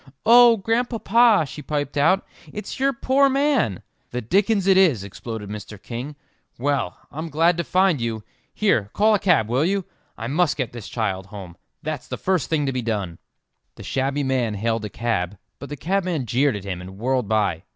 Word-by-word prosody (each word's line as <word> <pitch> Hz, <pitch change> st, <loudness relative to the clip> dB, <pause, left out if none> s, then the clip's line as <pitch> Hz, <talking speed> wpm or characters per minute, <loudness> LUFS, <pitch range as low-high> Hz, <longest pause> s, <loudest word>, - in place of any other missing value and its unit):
"Oh, 235 Hz, 0 st, +7 dB
Grandpapa," 230 Hz, -2 st, +3 dB
she 150 Hz, -, -9 dB
piped 145 Hz, -1 st, -3 dB
out, 165 Hz, +7 st, +3 dB, 0.3 s
"it's 210 Hz, +5 st, -7 dB
your 275 Hz, +1 st, +3 dB
poor 275 Hz, +2 st, +2 dB
man!" 270 Hz, -, +1 dB, 0.3 s
"The 125 Hz, -, -3 dB
dickens 195 Hz, -, +1 dB
it 195 Hz, -1 st, +5 dB
is!" 165 Hz, -, +4 dB
exploded 105 Hz, +2 st, -7 dB
Mr. 105 Hz, -1 st, -8 dB
King. 125 Hz, +7 st, -6 dB, 0.4 s
"Well, 135 Hz, -8 st, -1 dB
I'm 160 Hz, +2 st, -5 dB
glad 165 Hz, +3 st, +3 dB
to 170 Hz, -, 0 dB
find 185 Hz, -4 st, +2 dB
you. 115 Hz, -2 st, -3 dB, 0.3 s
Here, 120 Hz, -, +1 dB
call 215 Hz, +2 st, +4 dB
a 210 Hz, -, +3 dB
cab, 170 Hz, -, +3 dB
will 125 Hz, +5 st, +1 dB
you? 195 Hz, +2 st, 0 dB, 0.3 s
I 115 Hz, -, -5 dB
must 150 Hz, +5 st, +1 dB
get 130 Hz, -5 st, -3 dB
this 120 Hz, -4 st, -8 dB
child 95 Hz, -5 st, -2 dB
home; 95 Hz, -4 st, -10 dB, 0.3 s
that's 155 Hz, -4 st, -4 dB
the -, -, -5 dB
first 185 Hz, -6 st, 0 dB
thing 150 Hz, -3 st, +1 dB
to 135 Hz, -, -1 dB
be 125 Hz, -, -1 dB
done." 100 Hz, -7 st, -3 dB, 0.6 s
The -, -, -11 dB
shabby 135 Hz, +2 st, -1 dB
man 125 Hz, -5 st, 0 dB
hailed 115 Hz, +1 st, -1 dB
a -, -, -5 dB
cab, 105 Hz, -4 st, -2 dB, 0.2 s
but 140 Hz, -, -8 dB
the 145 Hz, -, -6 dB
cabman 180 Hz, -3 st, -1 dB
jeered 130 Hz, +3 st, +1 dB
at 100 Hz, -, -6 dB
him 90 Hz, -3 st, -5 dB
and 95 Hz, +1 st, -10 dB
whirled 125 Hz, 0 st, 0 dB
by. 105 Hz, -6 st, +1 dB
140 Hz, 190 wpm, -23 LUFS, -, 0.6 s, Oh